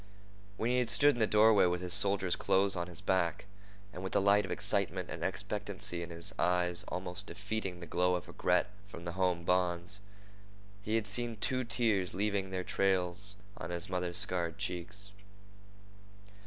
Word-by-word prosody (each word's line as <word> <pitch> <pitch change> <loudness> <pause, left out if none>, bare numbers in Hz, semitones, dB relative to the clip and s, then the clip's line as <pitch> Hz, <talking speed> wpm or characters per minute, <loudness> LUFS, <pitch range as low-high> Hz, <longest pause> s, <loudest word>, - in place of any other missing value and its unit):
When 115 +2 0
he 125 - +2
had 125 -2 0
stood 145 +4 +5
in 120 - -6
the 110 - +3
doorway 105 -2 +5
with 90 0 0
his 90 -1 -2
soldier's 100 -2 +5
clothes 95 +1 +2
on 85 0 -3
his 85 0 -10
back, 95 -4 0 0.5
and 90 - -7
with 95 - -5
the - - +4
light 100 +1 +4
of - - -9
excitement - - -1
and - - -5
expectancy 100 -4 -1
in 85 - -6
his 85 -1 -3
eyes 90 -1 +2
almost 90 +2 -4
defeating 100 -3 -4
the - - -6
glow 90 +2 +1
of 90 - -5
regret 90 +3 0 0.2
for 100 - -10
the 85 0 -5
home 90 -1 0
bonds, 90 +2 -1 0.8
he 110 +2 -2
had 110 -2 0
seen 115 +3 -1
two 130 +4 -1
tears 110 -6 0
leaving 100 -1 -1
their 95 -1 -3
trails 95 +2 0 0.2
on 80 - -6
his 85 +1 -2
mother's 90 -1 -2
scarred 85 -2 0
cheeks. 100 +2 -5
95 Hz, 175 wpm, -32 LUFS, 90-105 Hz, 0.8 s, stood